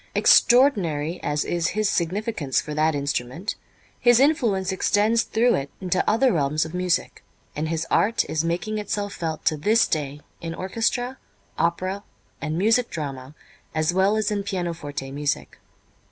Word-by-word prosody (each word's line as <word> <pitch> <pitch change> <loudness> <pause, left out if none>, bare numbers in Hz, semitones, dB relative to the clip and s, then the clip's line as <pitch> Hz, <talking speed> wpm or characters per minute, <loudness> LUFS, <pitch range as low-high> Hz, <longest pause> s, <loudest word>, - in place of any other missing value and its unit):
Extraordinary 185 - +4
as 150 0 -1
is 170 -1 0
his 215 -1 +2
significance 180 - -1
for 150 - -5
that 155 +1 +2
instrument, 140 - -2 0.5
his 240 -1 +5
influence 230 -10 +2
extends 210 +4 +2
through 235 +2 +2
it 140 0 -2
into 185 -1 0
other 245 +3 +3
realms 150 0 +1
of 160 - -8
music, 180 -1 -1 0.3
and 155 +1 -2
his 165 0 -1
art 225 +3 +2
is 160 0 -1
making 180 +6 -2
itself 205 0 -3
felt 160 -2 -4
to 155 - +3
this 215 +10 +3
day 145 -2 -3 0.2
in 165 0 -5
orchestra, 235 +6 -2 0.4
opera 185 +4 -1 0.4
and 155 +2 -2
music 225 +6 +2
drama 140 -2 -6 0.4
as 155 +2 +1
well 195 +3 +3
as 215 0 0
in 205 -1 0
pianoforte 165 -8 -4
music. 145 +1 -3
180 Hz, 150 wpm, -24 LUFS, 155-215 Hz, 0.5 s, his